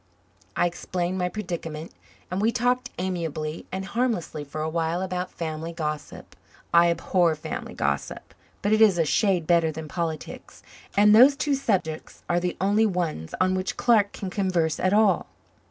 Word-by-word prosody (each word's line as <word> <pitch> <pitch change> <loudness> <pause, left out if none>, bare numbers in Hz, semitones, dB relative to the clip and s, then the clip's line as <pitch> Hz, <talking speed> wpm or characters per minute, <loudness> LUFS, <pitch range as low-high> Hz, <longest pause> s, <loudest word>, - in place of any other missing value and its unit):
I - - +2
explained 180 +1 -2
my 180 0 0
predicament 170 -5 -5 0.4
and 185 +2 -1
we 225 +2 +3
talked 245 +1 0
amiably 165 -4 -3
and 190 +1 -4
harmlessly 220 -9 -2
for 145 +2 -6
awhile 165 +3 -1
about 180 -1 -3
family 160 0 -5
gossip. 155 -2 -5 0.4
I 170 0 +6
abhor 170 -1 +2
family 155 - -6
gossip, - - -3 0.3
but 205 - +2
it 215 - +3
is 205 -5 +6
a 165 - +2
shade 185 +1 +2
better 170 -1 +3
than 155 0 -7
politics, 160 -1 -5 0.3
and 210 +1 +7
those 260 +5 +8
two 290 0 0
subjects 190 - -2
are 175 0 +2
the 180 0 -3
only 205 +3 +3
ones 170 - -3
on 185 0 +3
which 185 0 -2
Clark 215 -4 +3
can 190 -2 -6
converse 180 -5 0
at 185 - +1
all. 205 -3 +3
180 Hz, 160 wpm, -25 LUFS, 165-205 Hz, 0.4 s, those